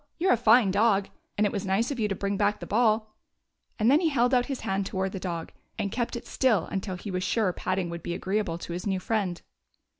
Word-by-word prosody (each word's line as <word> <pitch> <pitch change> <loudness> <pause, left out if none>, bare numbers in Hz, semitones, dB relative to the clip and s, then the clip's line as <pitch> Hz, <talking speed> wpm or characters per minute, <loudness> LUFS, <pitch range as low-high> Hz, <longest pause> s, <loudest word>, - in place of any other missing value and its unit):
You 370 +3 +1
're - - +6
a - - +6
fine 225 -2 +5
dog, 200 -1 +2 0.3
and 210 - +3
it 205 - +1
was 200 - -2
nice 200 +7 0
of 265 - -4
you 215 - +2
to 195 - -2
bring 200 +1 -2
back 205 +1 +1
the - - -6
ball; 215 -1 +1 0.3
" - - -48
and 225 +3 +3
then 290 - +6
he 335 -2 +2
held 250 -3 +2
out 250 -1 +3
his 275 -3 -4
hand 195 +1 -1
toward 190 0 -2
the 190 - -5
dog, 170 -3 -4 0.3
and 205 -3 -2
kept 240 +2 -2
it 235 - -6
still 225 -10 +2
until 190 -1 -3
he 190 +3 -7
was 185 0 -2
sure 195 -1 +1
patting 185 0 -2
would 170 0 -6
be 170 - -4
agreeable 190 -2 -1
to 170 - -7
his 180 +4 -4
new 190 -1 0
friend. 185 -4 -2
205 Hz, 260 wpm, -27 LUFS, 190-230 Hz, 0.3 s, re